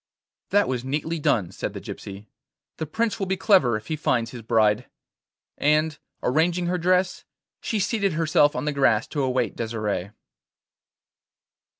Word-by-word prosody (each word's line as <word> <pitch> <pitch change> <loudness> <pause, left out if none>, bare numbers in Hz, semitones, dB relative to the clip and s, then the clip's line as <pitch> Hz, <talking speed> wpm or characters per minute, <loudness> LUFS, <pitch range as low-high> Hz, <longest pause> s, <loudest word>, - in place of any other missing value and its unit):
'That 205 +1 +3
was 125 -2 -2
neatly 150 +5 -2
done,' 100 - +1
said - - -4
the - - -6
gypsy. 100 +1 -8 0.5
'The 160 - -4
Prince 225 +8 -1
will 195 - -1
be 190 0 0
clever 185 - +4
if 110 - -11
he 155 - -2
finds 120 -6 0
his 125 - -8
bride.' 110 0 +2 0.7
And, 150 0 +2 0.2
arranging 170 +6 +2
her 180 +1 0
dress, 180 +1 +1 0.4
she 220 - -1
seated 200 -2 0
herself 155 -2 +3
on - - -2
the 150 - 0
grass 120 -5 +3
to 145 - -2
await 130 -4 0
Desire. 105 -4 -3
145 Hz, 155 wpm, -24 LUFS, 115-175 Hz, 0.7 s, clever